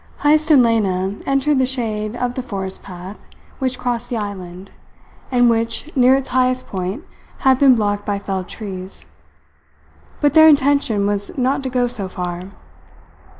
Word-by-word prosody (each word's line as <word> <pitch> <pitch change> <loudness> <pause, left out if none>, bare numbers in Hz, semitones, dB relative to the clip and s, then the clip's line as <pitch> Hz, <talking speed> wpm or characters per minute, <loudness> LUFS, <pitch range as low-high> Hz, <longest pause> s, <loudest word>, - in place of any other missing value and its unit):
Heyst 305 +2 +3
and 280 -5 +7
Lena 195 -5 +1
entered 275 +1 +2
the 260 - +3
shade 220 -4 -3
of 245 0 -2
the 255 - -3
forest 190 -6 -5
path 185 +1 -10 0.4
which 260 -2 -1
crossed 245 -1 -3
the 240 - -2
island, 190 -3 -7 0.6
and 245 -1 +4
which, 230 +6 -1
near 255 0 +5
its 270 -1 -3
highest 255 0 +1
point 190 - -4 0.4
had 265 -1 +4
been 270 -3 +6
blocked 205 -2 -1
by 205 -1 -2
felled 190 -2 -4
trees. 190 -3 -8 1.1
But 290 -2 +2
their 315 0 +8
intention 280 -8 +3
was 205 +3 -2
not 260 +2 +1
to 265 - -4
go 250 -1 +1
so 225 -6 -4
far. 180 0 -5
235 Hz, 155 wpm, -19 LUFS, 200-260 Hz, 1.1 s, their